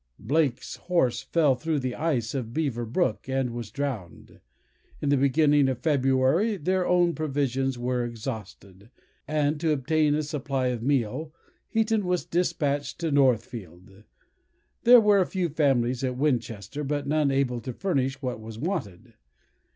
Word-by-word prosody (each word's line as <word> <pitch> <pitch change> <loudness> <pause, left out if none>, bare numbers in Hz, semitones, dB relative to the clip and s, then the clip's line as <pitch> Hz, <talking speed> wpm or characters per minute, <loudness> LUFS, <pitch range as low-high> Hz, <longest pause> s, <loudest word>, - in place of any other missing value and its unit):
Blake's 140 0 -1
horse 130 -10 0
fell 145 +1 +2
through 155 +5 -2
the 130 -2 -2
ice 130 -8 -1
of 125 -3 -4
Beaver 130 -7 -1
brook, 130 -2 -1
and 130 -2 0
was 115 -2 -6
drowned. 120 - -6 0.6
In 145 - -1
the 145 - +4
beginning 140 +1 +3
of 130 - -1
February 135 - +2
their 185 +3 0
own 175 -1 +3
provisions 135 -4 -1
were 125 0 -1
exhausted, 105 -4 -7 0.4
and, 150 0 0
to 160 0 +1
obtain 150 +1 +2
a 155 - 0
supply 140 -3 -2
of 120 -2 -3
meal, 135 +3 -1 0.4
Heaton 220 -1 +1
was 180 -1 -1
despatched 145 -5 -1
to 165 -2 -2
Northfield. 110 - -1 0.8
There 245 +1 +9
were 210 -2 +4
a 185 - +3
few 185 -3 -1
families 130 -5 +1
at 125 -1 -2
Winchester, 125 -2 -2
but 145 0 -2
none 150 0 +1
able 135 -3 0
to 130 - -5
furnish 135 -3 -2
what 125 -3 -3
was 110 0 -9
wanted. 135 - -4
135 Hz, 150 wpm, -26 LUFS, 120-155 Hz, 0.8 s, There